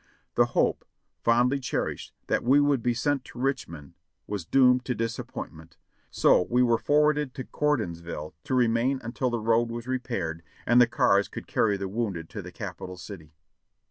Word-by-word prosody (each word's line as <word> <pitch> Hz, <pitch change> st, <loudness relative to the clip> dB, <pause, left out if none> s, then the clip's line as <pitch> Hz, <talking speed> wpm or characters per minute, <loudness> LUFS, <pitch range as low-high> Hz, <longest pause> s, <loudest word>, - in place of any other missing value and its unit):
The -, -, +4 dB
hope, -, -, +2 dB, 0.4 s
fondly 125 Hz, +4 st, +3 dB
cherished, 130 Hz, -, -3 dB
that -, -, 0 dB
we 135 Hz, +4 st, +5 dB
would 145 Hz, -3 st, +2 dB
be 120 Hz, 0 st, 0 dB
sent 135 Hz, +3 st, 0 dB
to -, -, -13 dB
Rich 135 Hz, 0 st, -1 dB
mond 75 Hz, -4 st, -11 dB, 0.3 s
was 100 Hz, -5 st, -5 dB
doomed 125 Hz, -2 st, +4 dB
to 125 Hz, -, -1 dB
disappointment, 85 Hz, -7 st, -6 dB, 0.3 s
so -, -, +4 dB
we 125 Hz, +1 st, +3 dB
were 120 Hz, -2 st, +3 dB
forwarded 150 Hz, -2 st, +2 dB
to 130 Hz, -, -4 dB
Gordonsville 85 Hz, -, -2 dB
to 130 Hz, -, -1 dB
remain 125 Hz, +2 st, +2 dB
until 125 Hz, +2 st, -2 dB
the 120 Hz, -, -1 dB
road 115 Hz, +1 st, +2 dB
was 115 Hz, 0 st, -5 dB
repaired 115 Hz, -11 st, -3 dB, 0.2 s
and 120 Hz, +2 st, +5 dB
the 120 Hz, -, +6 dB
cars 100 Hz, -3 st, +3 dB
could -, -, -8 dB
carry 105 Hz, -2 st, +1 dB
the 95 Hz, 0 st, -4 dB
wounded 95 Hz, -6 st, -3 dB
to -, -, -5 dB
the -, -, -10 dB
Capital 90 Hz, 0 st, -7 dB
City. 80 Hz, -5 st, -11 dB
120 Hz, 175 wpm, -27 LUFS, 95-130 Hz, 0.4 s, the